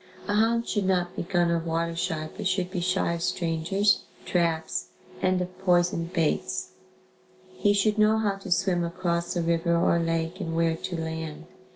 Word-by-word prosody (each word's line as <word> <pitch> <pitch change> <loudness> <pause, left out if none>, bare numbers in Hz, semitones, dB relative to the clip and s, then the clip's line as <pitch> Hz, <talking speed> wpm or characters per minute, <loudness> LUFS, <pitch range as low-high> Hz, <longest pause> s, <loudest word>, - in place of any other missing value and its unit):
] - - -17
A 205 - 0
hound 230 +2 +2
should 205 -3 0
not 180 -1 +1
be - - -2
gun 175 -1 +1
or 170 - +2
water 165 0 -2
shy 160 -2 -2
but - - -2
should 185 -1 0
be 185 - -2
shy 185 -1 +1
of 170 - -4
strangers, 175 +5 +1 0.2
traps 165 -2 0 0.3
and 185 0 +2
of 180 0 -5
poisoned 175 -2 +2
baits. 165 -4 0 0.8
He 205 - +2
should 210 +1 +2
know 215 +1 +5
how 205 -3 0
to 195 -1 -9
swim 175 0 +2
across 170 0 -1
a 175 - 0
river 170 0 +2
or 170 0 +3
lake 165 +2 -1
and 165 -3 -3
where 165 0 +2
to 175 +1 -5
land. 160 -1 -5
175 Hz, 185 wpm, -27 LUFS, 165-190 Hz, 0.8 s, know